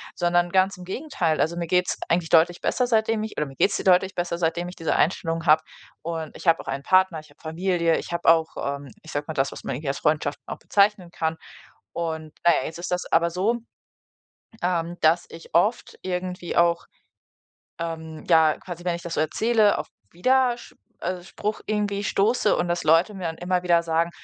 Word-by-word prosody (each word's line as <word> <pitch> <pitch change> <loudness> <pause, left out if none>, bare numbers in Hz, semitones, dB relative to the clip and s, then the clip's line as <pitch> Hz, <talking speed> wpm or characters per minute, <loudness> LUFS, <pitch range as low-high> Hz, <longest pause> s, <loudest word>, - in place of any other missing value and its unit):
Sondern 175 0 +1
ganz 190 +1 +3
im 180 - -10
Gegenteil. 190 - -1
Also 165 +2 +1
mir 170 -1 -3
geht's 180 +1 +1
eigentlich 170 -1 +1
deutlich 170 +1 +4
besser, 250 - +1
seitdem 225 -1 +1
ich 220 - -5
oder 150 - 0
mir 135 -2 -11
geht's 195 - +2
deutlich 190 +1 +3
besser, 175 -1 -2
seitdem 170 +1 0
ich 180 - -9
diese 165 - -1
Einstellungen 165 -1 0
habe. 155 -1 +6 0.4
Und 165 -1 -5
ich - - -9
habe 165 0 +5
auch - - -10
einen 140 - -3
Partner, 185 0 +3
ich 155 - -15
habe - - -23
Familie, 170 0 0
ich - - -8
habe 170 0 -3
auch, 160 -1 +6
ähm, 140 0 -4
ich 155 - -10
sage 145 0 -2
mal, 160 - -4
das, 135 -1 +1
was - - -10
man 135 - -3
irgendwie 140 +2 -4
als 135 - -2
Freundschaften 150 -1 0
auch - - -5
bezeichnen 200 -3 +1
kann. 160 -1 -2 0.6
Und 160 -2 -4
na 170 - +8
ja, - - -5
jetzt 160 - -7
ist 175 +1 -5
das 180 - 0
aber 170 +1 +3
so, 195 +7 0 1.1
ähm, 175 -1 -1
dass 160 +2 +3
ich 165 -1 -13
oft 210 +8 +1
irgendwie 180 -1 -4
auch, 170 0 +3 0.9
ähm, 160 -1 -6
ja, 160 -3 +5
quasi 175 -1 -9
wenn 175 -1 0
ich 170 - -11
das 170 -1 -5
so - - 0
erzähle, 215 +6 +2
auf - - -4 0.2
Widersch 250 +5 +1 0.3
also, 180 -1 -3
Spruch 210 +3 -4
irgendwie 205 -1 -1
stoße 215 +2 +2
und 175 - -1
dass 175 0 -1
Leute 165 +7 +4
mir 190 -2 -7
dann 160 -1 -3
immer 180 0 0
wieder 170 -2 +3
sagen, 165 0 0
175 Hz, 205 wpm, -24 LUFS, 160-185 Hz, 1.1 s, na